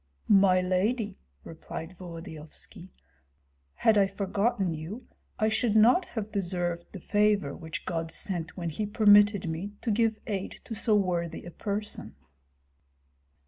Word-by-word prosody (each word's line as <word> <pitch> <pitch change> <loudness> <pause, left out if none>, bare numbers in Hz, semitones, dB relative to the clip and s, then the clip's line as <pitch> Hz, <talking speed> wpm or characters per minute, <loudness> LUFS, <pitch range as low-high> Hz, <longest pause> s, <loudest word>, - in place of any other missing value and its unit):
"My 190 -2 +5
lady," 200 - 0 0.2
replied 165 +2 -8
Volodyovski, 165 -3 -10 0.9
"had 215 - +4
I 195 - +4
forgotten 200 -1 0
you 165 +11 -7 0.3
I 215 - +2
should 220 0 +1
not 240 - +6
have 215 -2 -5
deserved 175 -3 -2
the 195 - -8
favor 205 -7 +1
which 160 -1 -7
God 165 -2 -3
sent 175 -1 -3
when 170 -2 -3
he 210 +7 -3
permitted 205 -2 +5
me 170 +6 -4
to 230 - -1
give 220 0 +2
aid 200 -4 -4
to - - -7
so 220 0 +1
worthy 175 -4 -1
a 175 - -8
person." 210 +3 -4
195 Hz, 135 wpm, -28 LUFS, 170-215 Hz, 0.9 s, not